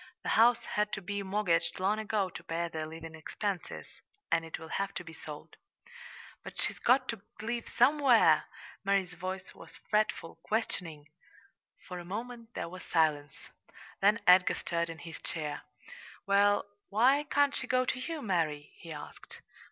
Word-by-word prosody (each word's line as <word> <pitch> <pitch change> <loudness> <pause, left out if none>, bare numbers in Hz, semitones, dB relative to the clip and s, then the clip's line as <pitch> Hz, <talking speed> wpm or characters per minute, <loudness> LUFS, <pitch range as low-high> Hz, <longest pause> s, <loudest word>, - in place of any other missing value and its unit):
"The - - -2
house 235 +1 +5
had 210 0 0
to 195 - -2
be 200 +2 -3
mortgaged 190 -4 +1
long 200 +3 +1
ago 215 -2 0
to - - -9
pay 170 +1 -2
their 160 -1 -4
living 165 0 -8
expenses, 175 +3 -4 0.5
and 165 -1 +3
it 165 - -6
will 160 0 -10
have 195 0 -2
to - - -4
be 165 -1 -10
sold." 150 -2 -10 0.9
"But - - -9
she's - - -1
got 255 +1 +4
to 230 -4 -3 0.2
live 235 +2 -3
somewhere!" 265 -1 +5 0.4
Mary's 195 -3 +1
voice 185 +2 -5
was - - -14 0.2
fretful, 210 -6 0
questioning. 170 -9 -2 0.8
For 180 -1 -5
a - - -7
moment 230 +5 -6
there - - -3
was 185 +2 -9
silence; 150 -4 +1 0.7
then 205 +3 +5
Edgar 180 0 +6
stirrad 170 -1 -1
in 165 - -6
his 165 -1 -9
chair. 150 -3 -4 0.6
"Well, 200 +1 +4 0.2
why 250 +8 +4
can't 285 -1 +2
she 260 - -1
go 255 0 +2
to 255 - -1
you, 300 +3 -4
Mary?" 160 -7 -1
he 165 - -10
asked. 150 -1 -10
195 Hz, 160 wpm, -31 LUFS, 165-225 Hz, 0.9 s, Edgar